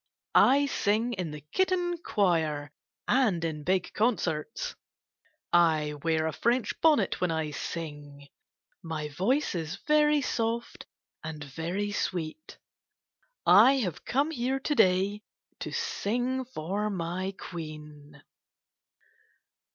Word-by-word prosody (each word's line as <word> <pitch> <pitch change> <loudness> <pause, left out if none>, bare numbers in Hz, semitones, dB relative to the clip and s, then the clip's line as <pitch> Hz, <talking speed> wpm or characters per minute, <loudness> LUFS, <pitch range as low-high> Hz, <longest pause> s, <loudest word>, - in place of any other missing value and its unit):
I 280 +2 +6
sing 230 -2 0
in 180 -6 -3
the 150 0 -8
kitten 360 -2 +1
choir 160 - 0 0.4
and 215 -11 +2
in 155 -2 -4
big 185 +2 0
concerts. 180 -9 -1 0.8
I 160 -3 +4
wear 160 0 +1
a 160 - 0
French 235 - +1
bonnet 315 -2 +3
when 180 - +2
I 160 -2 -1
sing. 145 -3 -6 0.5
My 160 -3 -4
voice 240 - 0
is 165 0 -3
very 300 0 +4
soft 235 -3 -2 0.4
and 155 -1 -6
very 170 +8 -3
sweet. 180 - -4 0.9
I 265 - +8
have 220 - -2
come 280 +5 +1
here 265 -1 -1
to 295 +2 -1
day 195 -2 +3 0.4
to - - -5
sing 250 +5 -1
for 205 -1 -3
my 185 +1 -3
Queen. 150 -3 -9
185 Hz, 110 wpm, -28 LUFS, 155-245 Hz, 0.9 s, I